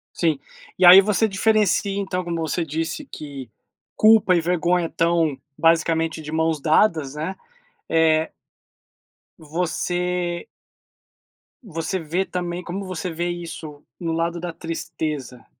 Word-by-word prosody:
Sim. 160 Hz, -5 st, +1 dB, 0.4 s
E 185 Hz, -, +5 dB
aí 185 Hz, +2 st, +11 dB
você 210 Hz, +2 st, +2 dB
diferencia 200 Hz, -1 st, +1 dB
então, 185 Hz, -2 st, -2 dB
como 170 Hz, -1 st, -3 dB
você 165 Hz, +2 st, -1 dB
disse, 160 Hz, -, -3 dB
que 140 Hz, -, -9 dB, 0.5 s
culpa 215 Hz, -3 st, +6 dB
e 175 Hz, -, +4 dB
vergonha 175 Hz, +1 st, +1 dB
estão 165 Hz, -4 st, +1 dB, 0.2 s
basicamente 165 Hz, -1 st, +2 dB
de 150 Hz, 0 st, -8 dB
mãos 160 Hz, -1 st, 0 dB
dadas, 155 Hz, -3 st, +2 dB
né? 160 Hz, +6 st, -4 dB, 0.5 s
Eh 160 Hz, -1 st, +3 dB, 1.1 s
Você 175 Hz, +2 st, -2 dB, 1.2 s
você 170 Hz, -1 st, -3 dB
vê 170 Hz, +4 st, -1 dB
também 175 Hz, -1 st, -4 dB
como 190 Hz, +3 st, -5 dB
você 180 Hz, -1 st, -4 dB
vê 170 Hz, +2 st, -2 dB
isso, 165 Hz, -4 st, -7 dB, 0.2 s
no 165 Hz, -2 st, -2 dB
lado 170 Hz, +1 st, -1 dB
da 175 Hz, 0 st, -4 dB
tristeza? 155 Hz, -6 st, -5 dB
170 Hz, 125 wpm, -22 LUFS, 160-180 Hz, 1.2 s, aí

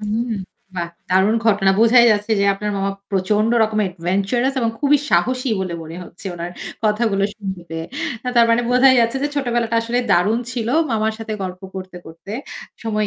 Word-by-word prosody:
হুম, 220 Hz, +3 st, -2 dB, 0.4 s
বাহ 170 Hz, -2 st, -3 dB, 0.2 s
দারুণ 190 Hz, +4 st, +3 dB
ঘটনা! 200 Hz, -3 st, +4 dB
বোঝাই 235 Hz, +1 st, +6 dB
যাচ্ছে 210 Hz, +1 st, -1 dB
যে -, -, +3 dB
আপনার 210 Hz, +1 st, -3 dB
মামা 195 Hz, 0 st, 0 dB, 0.2 s
প্রচন্ড 205 Hz, +3 st, +1 dB
রকমের 215 Hz, -1 st, +1 dB
adventurous 195 Hz, +9 st, 0 dB
এবং 230 Hz, -2 st, +1 dB
খুবই 290 Hz, 0 st, +4 dB
সাহসী 255 Hz, +9 st, +1 dB
বলে 185 Hz, -2 st, -3 dB
মনে 160 Hz, +1 st, -9 dB
হচ্ছে 180 Hz, +3 st, -12 dB
উনার 175 Hz, +1 st, -6 dB, 0.3 s
কথাগুলো 210 Hz, -2 st, +1 dB
শুনতে 190 Hz, -4 st, -6 dB
পেয়ে। 165 Hz, 0 st, -4 dB, 0.4 s
অ্যা 250 Hz, -, -2 dB
তার 235 Hz, 0 st, +6 dB
মানে 230 Hz, +1 st, +3 dB
বোঝা 250 Hz, +2 st, +6 dB
যাচ্ছে 230 Hz, +2 st, +1 dB
যে 290 Hz, -, +1 dB
ছোটবেলাটা 240 Hz, -4 st, 0 dB
আসলে 235 Hz, +2 st, -1 dB
দারুণ 205 Hz, +6 st, +3 dB
ছিল 230 Hz, -3 st, -3 dB, 0.2 s
মামার 220 Hz, -1 st, 0 dB
সাথে 225 Hz, -1 st, -5 dB
গল্প 185 Hz, -1 st, -5 dB
করতে, 185 Hz, -1 st, -7 dB
করতে 165 Hz, +5 st, -10 dB, 0.5 s
সময় 215 Hz, -2 st, 0 dB
215 Hz, 175 wpm, -20 LUFS, 190-230 Hz, 0.5 s, বোঝাই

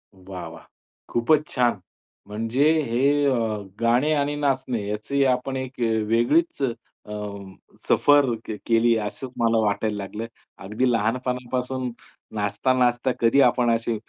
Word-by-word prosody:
वाह, 95 Hz, -1 st, -8 dB
वाह! -, -, -12 dB, 0.5 s
खूपच 150 Hz, +6 st, +2 dB
छान. 120 Hz, -5 st, +1 dB, 0.5 s
म्हणजे 115 Hz, +8 st, +1 dB
हे 140 Hz, +5 st, +2 dB
अ, 135 Hz, -, +3 dB, 0.5 s
गाणे 120 Hz, +6 st, +2 dB
आणि 145 Hz, 0 st, 0 dB
नाचणे 130 Hz, -7 st, -1 dB
याची 125 Hz, +7 st, -1 dB
आपण 130 Hz, +1 st, 0 dB
एक 130 Hz, -1 st, -6 dB, 0.3 s
वेगळीच 140 Hz, +9 st, +2 dB
अ, 115 Hz, -3 st, -6 dB, 0.7 s
सफर 145 Hz, -1 st, +5 dB, 0.2 s
क -, -, -5 dB, 0.2 s
केली 115 Hz, 0 st, +4 dB
असं 105 Hz, +5 st, -5 dB
मला 115 Hz, 0 st, +3 dB
वाटायला 105 Hz, +1 st, 0 dB
लागलं. 105 Hz, +3 st, -5 dB, 0.4 s
अगदी 120 Hz, +6 st, 0 dB
लहानपणापासून 125 Hz, +2 st, -2 dB, 0.5 s
नाचता, 105 Hz, +5 st, 0 dB
नाचता 125 Hz, +1 st, +2 dB
कधी 120 Hz, +4 st, +4 dB
आपण 120 Hz, -1 st, +3 dB
असे 115 Hz, 0 st, -2 dB
120 Hz, 125 wpm, -24 LUFS, 115-135 Hz, 0.7 s, सफर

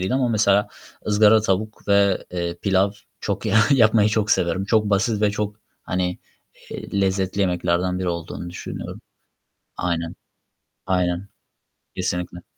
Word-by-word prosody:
değil 95 Hz, +7 st, -1 dB
ama 130 Hz, -2 st, +2 dB
mesela, 105 Hz, -2 st, +3 dB, 0.4 s
ızgara 105 Hz, +1 st, +5 dB
tavuk 105 Hz, +1 st, -2 dB
ve 100 Hz, -1 st, +3 dB
eee, 85 Hz, -1 st, -3 dB
pilav 95 Hz, 0 st, +3 dB, 0.3 s
çok 100 Hz, +2 st, -3 dB
ya 105 Hz, 0 st, +2 dB
yapmayı 110 Hz, -5 st, +5 dB
çok 105 Hz, 0 st, 0 dB
severim. 90 Hz, +3 st, +1 dB
Çok 105 Hz, 0 st, +2 dB
basit 105 Hz, +2 st, +1 dB
ve 105 Hz, -, +4 dB
çok, 105 Hz, 0 st, -3 dB, 0.3 s
hani, 90 Hz, 0 st, -2 dB, 0.5 s
eee, 100 Hz, -, -4 dB
lezzetli 95 Hz, 0 st, 0 dB
yemeklerden 90 Hz, 0 st, +1 dB
biri 90 Hz, -1 st, -2 dB
olduğunu 85 Hz, +1 st, -5 dB
düşünüyorum. 85 Hz, -, -7 dB, 0.8 s
Aynen, 85 Hz, -1 st, -2 dB, 0.7 s
aynen. 90 Hz, 0 st, 0 dB, 0.7 s
Kesinlikle. 90 Hz, -1 st, -3 dB
95 Hz, 130 wpm, -22 LUFS, 90-105 Hz, 0.8 s, ızgara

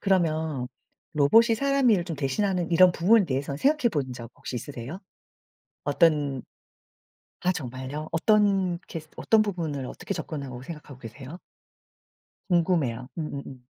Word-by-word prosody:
그러면 160 Hz, -8 st, +1 dB, 0.5 s
로봇이 225 Hz, -, +5 dB
사람 275 Hz, -1 st, +3 dB
일을 190 Hz, -5 st, +3 dB
좀 170 Hz, -2 st, -4 dB
대신하는 175 Hz, +6 st, 0 dB
이런 180 Hz, +1 st, +6 dB
부분에 200 Hz, +6 st, +4 dB
대해서 140 Hz, -2 st, -2 dB
생각해 280 Hz, -, +3 dB
본 135 Hz, -7 st, -2 dB
적 115 Hz, -1 st, -9 dB
혹시 -, -, -7 dB
있으세요? 135 Hz, -, -7 dB, 0.8 s
어떤 145 Hz, -3 st, +2 dB, 1.0 s
아 180 Hz, -, +2 dB
정말요? 135 Hz, +1 st, -5 dB
어떤 195 Hz, -1 st, +3 dB
케이스 155 Hz, -2 st, -7 dB
어떤 220 Hz, -1 st, +4 dB
부분을 160 Hz, -10 st, -3 dB
어떻게 -, -, -5 dB
접근하고 135 Hz, -5 st, -6 dB
생각하고 150 Hz, -2 st, -9 dB
계세요? 135 Hz, +8 st, -9 dB, 1.1 s
궁금해요. 160 Hz, -9 st, +1 dB
음음음. 140 Hz, -4 st, -6 dB
160 Hz, 310 characters per minute, -26 LUFS, 135-185 Hz, 1.1 s, 이런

